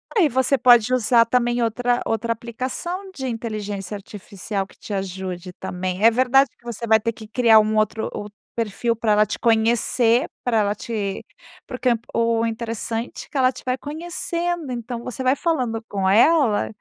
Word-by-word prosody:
Aí 340 -8 +4
você 260 +2 +2
pode 245 -1 +5
usar 235 -1 +4
também 240 0 +1
outra 245 +2 0
outra 230 +1 0
aplicação 255 - -5
de 265 -7 -5
inteligência 215 -4 -4
artificial 200 0 -6
que - - -21
te 210 - -7
ajude 185 -1 -4
também, 185 +3 -4
é 230 - +8
verdade 260 +3 +4
que - - -32
você 235 0 -5
vai 220 -1 +5
ter 230 +2 -1
que 215 -1 -11
criar 225 -1 +5
um 215 0 +1
outro 215 +1 0
outro 205 0 -7 0.2
perfil 230 +1 -1
para 220 -1 +1
ela 210 0 +4
te 205 - -5
conhecer 230 +3 +2 0.2
pra 235 -4 +2
ela 205 0 +1
te 205 -3 -4 0.4
porque 250 0 -1 0.2
o 230 0 +1
interessante 230 0 -4
é - - -27
que 285 - -4
ela 255 -1 +4
te - - -12
vai 255 +1 0
conhecendo, 340 0 -4
então 235 0 -5
você 255 +1 -5
vai 260 +2 +3
falando 255 -9 -1
com 195 -2 -1
ela, 235 +2 +4
230 Hz, 175 wpm, -22 LUFS, 215-255 Hz, 0.4 s, é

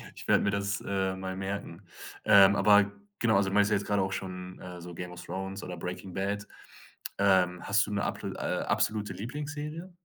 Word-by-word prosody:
Ich - - -10
werde - - +4
mir 100 - +2
das, 100 0 -1
äh, 95 -1 0
mal 95 0 -5
merken. 95 -2 -5 0.4
Ähm, 100 -1 +8
aber 100 0 +5 0.3
genau, 110 -3 +3
also 100 -1 +2
du 95 - -5
meinst 105 0 +4
ja 105 - +4
jetzt 100 - -5
gerade 100 -1 +1
auch 95 0 -1
schon, 90 -1 -6
äh, 90 -1 -9
so 90 0 -8
„Game 90 0 -6
of 90 - -9
Thrones“ 95 +2 -5
oder 90 -2 -6
„Breaking 90 +2 -6
Bad“. 100 +2 -2 0.7
Ähm, 95 -3 +3
hast 100 0 +3
du - - -5
'ne 100 - 0
ablo - - -3
äh, - - -2
absolute 105 -1 0
Lieblingsserie? 150 - -6
100 Hz, 205 wpm, -29 LUFS, 95-105 Hz, 0.7 s, Ähm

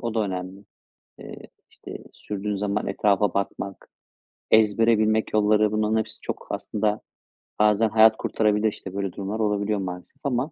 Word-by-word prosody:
o 115 -2 -4
da 110 - +1
önemli. 95 0 -4 0.6
Eee, - - -9 0.3
işte, - - -10 0.2
sürdüğün 105 0 -4
zaman 100 +1 -2
etrafa 100 -2 +1
bakmak, 100 0 -4 0.6
ezbere 110 +1 +4
bilmek 110 0 +1
yolları, 105 0 +3
bunların 110 +1 +1
hepsi 110 0 -3
çok - - -6
aslında 105 0 -2 0.6
bazen 105 +1 +3
hayat 110 0 +5
kurtarabilir. 105 0 +1
İşte, 95 - -9
böyle 100 -2 -3
durumlar 100 +3 -4
olabiliyor, 105 -1 0
maalesef 90 +6 -7
ama 135 +1 -1
105 Hz, 145 wpm, -24 LUFS, 100-110 Hz, 0.6 s, hayat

